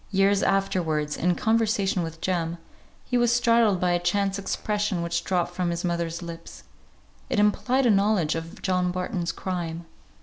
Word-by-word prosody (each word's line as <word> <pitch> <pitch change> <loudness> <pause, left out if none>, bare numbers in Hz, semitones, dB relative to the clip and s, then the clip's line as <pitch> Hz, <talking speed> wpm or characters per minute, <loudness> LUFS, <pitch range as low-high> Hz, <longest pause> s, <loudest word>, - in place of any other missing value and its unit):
Years 195 0 +3
afterwards 160 -6 0
in 180 +1 +1
conversation 215 -4 +1
with 165 -1 -6
Jem, 170 -2 -1 0.5
he 245 - +1
was 240 -1 +3
startled 230 -5 +3
by 180 0 +1
a 175 - +2
chance 195 +3 0
expression 205 -2 -1
which 170 0 -1
dropped 175 -2 -1
from 180 -1 -1
his 170 0 -3
mother's 170 -1 -2
lips; 170 -1 -9 0.7
it - - -1
implied 245 +6 +2
a 235 - +5
knowledge 200 -5 +2
of 165 +5 -7
John 180 -1 +1
Barton's 180 -1 -2
crime. 170 -3 -4
180 Hz, 160 wpm, -25 LUFS, 170-205 Hz, 0.7 s, a